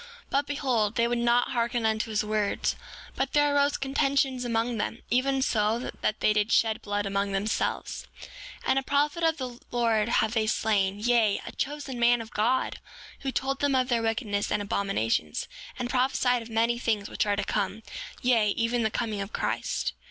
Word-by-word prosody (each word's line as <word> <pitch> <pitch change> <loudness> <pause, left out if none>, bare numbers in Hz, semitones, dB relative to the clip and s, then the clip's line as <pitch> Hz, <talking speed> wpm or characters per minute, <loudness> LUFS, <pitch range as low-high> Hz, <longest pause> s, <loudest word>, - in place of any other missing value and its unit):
But 280 +1 +1
behold, 250 -7 0
they 235 0 +3
would 240 0 0
not 240 +1 +2
hearken 235 -1 0
unto 220 0 0
his 215 -1 0
words; 210 -1 0 0.4
but - - -2
there 290 -1 +3
arose 285 0 +3
contentions 270 -1 +1
among 230 -1 -1
them, 225 +2 -3
even 265 +2 +2
so 215 -2 +1
much 245 - -5
that 215 - -1
they 215 - +4
did 210 +1 +1
shed 220 -1 +3
blood 205 0 -2
among 200 0 -1
themselves. 200 +3 -2
7:26 - - -10 0.4
And 270 - +3
a - - -3
prophet 290 +5 0
of 325 -1 +3
the 250 -3 -6
Lord 230 -2 +1
have 220 -1 +2
they 220 -2 +1
slain; 205 -3 +1
yea, 225 -2 +3
a - - -6
chosen 285 -3 -4
man 240 0 +4
of 225 -1 -8
God, 245 +5 0 0.4
who 270 - -3
told 270 +1 -1
them 285 -2 +2
of 255 0 +1
their 235 -2 +2
wickedness 225 -3 -1
and 210 - +2
abominations, 195 - -1 0.3
and 245 - -2
prophesied 250 -1 +2
of 230 - -10
many 230 +1 +1
things 215 -4 0
which 210 - -1
are 205 - +2
to 205 - -1
come, 205 +2 -2 0.4
yea, 230 -4 +4
even 235 +1 +1
the 220 - +2
coming 215 -2 -2
of 195 +2 -5
Christ. - - -2
230 Hz, 190 wpm, -27 LUFS, 215-255 Hz, 0.4 s, they